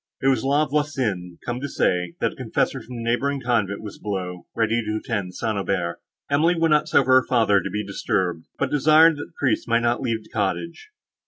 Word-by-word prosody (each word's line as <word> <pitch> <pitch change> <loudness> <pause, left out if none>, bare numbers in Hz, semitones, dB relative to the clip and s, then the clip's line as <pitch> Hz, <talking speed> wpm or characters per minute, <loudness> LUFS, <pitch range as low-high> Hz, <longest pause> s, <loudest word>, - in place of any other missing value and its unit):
It 135 - +2
was 130 -4 +1
La 145 +3 +2
Voisin, 130 - -2
come 120 0 -3
to 140 - -3
say, 90 -6 0
that - - +1
a - - -14
confessor - - -1
from 125 - -10
the 115 - -5
neighbouring 135 +4 0
convent 110 -5 -1
was 105 - -8
below, 90 -3 -5
ready 115 +1 +1
to 105 0 -2
attend 100 -6 -4
St. 110 -1 -2
Aubert. 90 -3 -2 0.3
Emily 155 +5 +3
would 165 -1 +2
not 150 0 +3
suffer 130 -2 +3
her - - -14
father 110 -5 +3
to - - -4
be 105 +2 -3
disturbed, 90 -4 -2
but 140 - -1
desired, 155 +2 +5
that 145 - -5
the - - -28
priest 130 - 0
might 115 0 +2
not 120 +2 +1
leave 115 -4 -2
the - - -20
cottage. 165 - -3
115 Hz, 215 wpm, -23 LUFS, 100-140 Hz, 0.3 s, desired